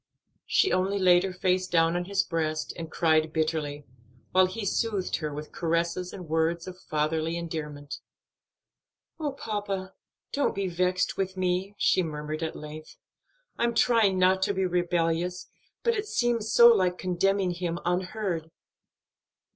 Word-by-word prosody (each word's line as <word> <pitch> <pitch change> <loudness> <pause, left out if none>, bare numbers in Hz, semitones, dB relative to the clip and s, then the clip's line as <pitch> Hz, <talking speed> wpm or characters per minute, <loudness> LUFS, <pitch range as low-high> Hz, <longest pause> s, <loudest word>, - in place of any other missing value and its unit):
She 390 - +3
only 190 +2 +1
laid 180 -2 +5
her 190 - -2
face 185 0 0
down 165 -1 +3
on 175 0 -1
his 195 +1 +1
breast 155 -2 -2
and 165 -2 -6
cried 160 -1 +2
bitterly, 155 -2 -2 0.5
while 185 0 +5
he 205 +3 -5
soothed 200 -2 0
her 155 -2 -4
with 150 +1 -7
caresses 170 +2 -1
and 180 -4 -9
words 160 +2 0
of 185 0 -9
fatherly 155 +2 0
endearment. 150 -4 -5 1.2
"Oh, 300 -2 -1
papa, 200 -6 -4 0.4
don't 285 - +1
be 200 0 -1
vexed 180 +1 0
with 190 -1 -2
me," 185 +2 -1
she 185 - +3
murmured 155 -1 -4
at 160 -1 -3
length. 155 +1 -9 0.6
"I'm 235 -1 +1
trying 225 -6 +4
not 185 +1 +3
to 200 +1 +1
be 190 0 +1
rebellious, 175 0 0 0.3
but 470 - +3
it 425 -1 -3
seems 235 - 0
so 235 0 +9
like 185 -5 +3
condemning 190 +1 +1
him 175 -1 -3
unheard." 180 -2 -2
180 Hz, 145 wpm, -27 LUFS, 165-195 Hz, 1.2 s, so